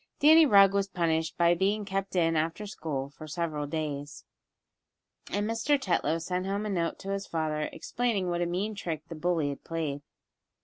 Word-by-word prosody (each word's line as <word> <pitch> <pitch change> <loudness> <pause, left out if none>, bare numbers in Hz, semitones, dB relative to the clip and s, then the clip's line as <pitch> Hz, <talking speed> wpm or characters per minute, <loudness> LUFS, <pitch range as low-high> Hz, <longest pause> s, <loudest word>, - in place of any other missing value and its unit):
Danny 315 +1 +7
Rugg 200 -4 +7
was 200 0 +1
punished 165 -3 -1
by 170 0 +5
being 200 +4 0
kept 195 0 -3
in 165 -2 +3
after 165 +6 -1
school 145 -8 -4
for 155 +2 -11
several 155 -2 -3
days, 145 -2 -4 1.0
and 205 +1 -1
Mr. 230 +6 +1
Tetlow 170 -7 +1
sent 180 +3 -3
home 200 +2 -1
a - - -2
note 170 -3 -1
to 195 - -4
his 200 0 -4
father, 155 -2 -1
explaining 230 -6 -1
what 175 0 -1
a 175 - +1
mean 190 +5 -2
trick 165 -6 -4
the - - -5
bully 160 -2 0
had 140 - -7
played. 155 -4 -3
175 Hz, 180 wpm, -29 LUFS, 160-200 Hz, 1.0 s, Danny